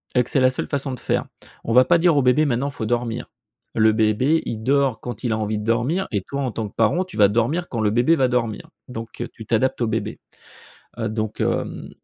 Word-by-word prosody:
et 125 - +4
que - - -9
c'est 135 - +2
la 130 0 +5
seule 130 - -3
façon 140 -2 -2
de 125 - -7
faire. - - -1 0.4
On 115 - -3
va 125 +1 +7
pas 175 - +4
dire 170 -3 +4
au - - +5
bébé: 135 +5 +4
«Maintenant 135 +1 0
il - - -10
faut 110 - -4
dormir». 120 0 -2 0.5
Le 110 -1 +5
bébé, 110 +8 +2
il 110 -1 -4
dort 135 -4 +2
quand 120 -2 -7
il 115 -2 0
a - - 0
envie 105 0 -2
de - - -5
dormir 125 - 0
et 100 -3 0
toi 140 0 -3
en 130 -3 -1
tant 110 -1 -3
que - - -24
parent, 115 - +2
tu 185 - -11
vas 100 -1 +7
dormir 120 - 0
quand 115 - -3
le 105 -1 +2
bébé 120 +9 +3
va 130 -4 +2
dormir. 115 -4 -2 0.2
Donc 115 -2 -6
tu 110 - -10
t'adaptes 120 +3 0
au 115 - +2
bébé, - - -3 0.8
heu, 110 -1 -1
donc 110 -1 -3
hem, - - -2
120 Hz, 250 wpm, -22 LUFS, 110-135 Hz, 0.8 s, va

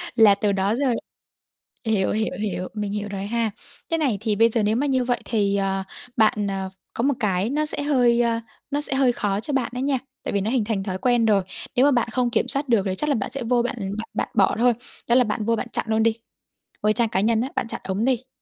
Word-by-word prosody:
Là 215 -3 +7
từ 205 0 +1
đó 195 +3 +1
giờ 265 -2 +1 0.9
hiểu, 210 -4 +1
hiểu, 220 +1 -1
hiểu, 185 -3 -2
mình 210 -2 -3
hiểu 210 0 -3
rồi 195 0 -4
ha. 225 0 0 0.4
Thế 330 - +3
này 265 -10 +1
thì 215 -2 0
bây 230 +2 +5
giờ 225 -1 0
nếu 215 +2 +2
mà 285 +2 +1
như 260 -2 +2
vậy 245 -1 +1
thì, 200 -3 +1
ờ, 195 -1 0 0.3
bạn, 215 -2 +3
ờ, 190 -1 -3 0.2
có 230 - -2
một 285 +1 +3
cái 200 0 0
nó 305 +2 0
sẽ 285 - -3
hơi, 245 -5 +3
ơ, 230 -1 +1 0.3
nó 290 +1 0
sẽ 275 - -2
hơi 260 -3 +3
khó 200 -2 -1
cho 285 +6 -3
bạn 265 -3 +1
ấy 250 - -2
nha, 270 -2 +1 0.2
tại - - -3
vì 200 - +1
nó 215 - -1
hình 250 -5 +2
thành 205 -4 -1
thói 185 -2 -3
quen 240 +2 +2
rồi. 200 -3 +3 0.3
Nếu 255 +3 +5
mà 290 - +5
bạn 240 -2 +1
không 250 0 +1
kiểm 250 - +1
soát 275 +1 0
được 225 -4 +4
thì 190 -1 -1
chắc 300 +9 -1
là 280 - +3
bạn 220 +2 -3
sẽ 270 -2 -4
vô 240 +1 +2
bạn 245 - -2 0.2
bạn 225 - -5
bạn - - -2
bỏ - - +4
thôi, 245 0 +5 0.4
đó 240 - +5
là 255 - +6
bạn 215 -1 -2
vô 230 0 +2
bạn - - -3
chặn - - 0
luôn 220 0 +2
đi, 230 0 +2 0.7
vô 215 - +4
trang 230 0 +1
cá 190 - 0
nhân 225 +1 +2
á, 260 - -2
bạn - - -1
chặn - - -6
ổng 195 +5 -1
đi. 260 0 0
230 Hz, 265 wpm, -23 LUFS, 205-250 Hz, 0.9 s, Là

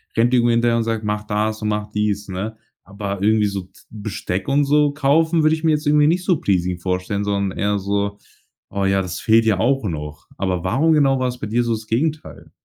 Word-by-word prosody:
rennt 120 +2 +2
dir 125 - +5
irgendwie 120 0 +3
hinterher 115 0 +2
und 115 - +1
sagt: 115 -1 -2
„Mach 105 0 -2
das 110 +1 -1
und 105 - -1
mache 105 0 -2
dies“, 105 -1 -1
ne, 100 +4 -5 0.3
aber 100 -1 -5
irgendwie 110 0 +3
so 100 -2 -5 0.2
Besteck 100 -3 -4
und 140 +1 +2
so 145 0 +3
kaufen 160 +3 +2
würde 155 +1 +4
ich 160 - -9
mir 160 - +3
jetzt 150 0 -1
irgendwie 150 0 +4
nicht 180 +3 +1
so 180 -5 +3
pleasing 90 -2 0
vorstellen, 95 +3 -2
sondern 100 -2 -1
eher 100 0 0
so: 100 +1 -2 0.5
„Oh 100 -1 -2
ja, 95 0 +2
das 90 -2 -5
fehlt 115 0 +4
ja 105 -4 +2
auch 135 +3 +1
noch.“ 75 -4 -6
Aber 90 -2 -1
warum 135 +12 +2
genau 135 -3 +3
war's 125 -1 -2
bei - - -4
dir 120 +3 +1
so 120 - -1
das 110 -1 -6
Gegenteil? 150 +7 -3
110 Hz, 225 wpm, -20 LUFS, 100-135 Hz, 0.5 s, dir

